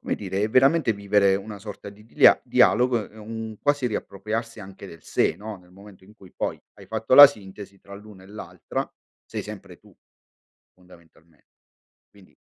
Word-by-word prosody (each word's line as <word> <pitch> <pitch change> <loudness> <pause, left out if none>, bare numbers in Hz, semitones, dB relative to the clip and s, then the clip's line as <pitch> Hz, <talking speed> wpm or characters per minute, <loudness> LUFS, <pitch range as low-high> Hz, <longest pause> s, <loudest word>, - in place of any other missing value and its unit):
come - - -3
dire, 95 0 -4
è 105 - 0
veramente 135 +1 +3
vivere 100 -1 +1
una 100 +1 -6
sorta 100 0 -10
di 100 +1 -15
dia 115 - +5
dialogo, 120 -3 +2
è 110 - -20
un 110 0 -8
quasi 145 -3 0
riappropriarsi 110 +1 -5
anche 100 0 -12
del 85 -3 -14
sé, - - 0
no, 105 0 -8
nel 90 -1 -22
momento 100 0 -17
in 105 +3 -19
cui 95 -4 -18
poi - - -4
hai - - -16
fatto 110 +2 -1
la 145 +2 +12
sintesi 100 -5 -11
tra 100 0 -13
l'una 100 -2 -14
e - - -16
l'altra, 100 +5 -7 0.4
sei - - -6
sempre - - -11
tu, - - -23 0.8
fondamentalmente, 85 -3 -23 0.6
quindi 100 -2 -22
105 Hz, 175 wpm, -23 LUFS, 95-110 Hz, 0.8 s, la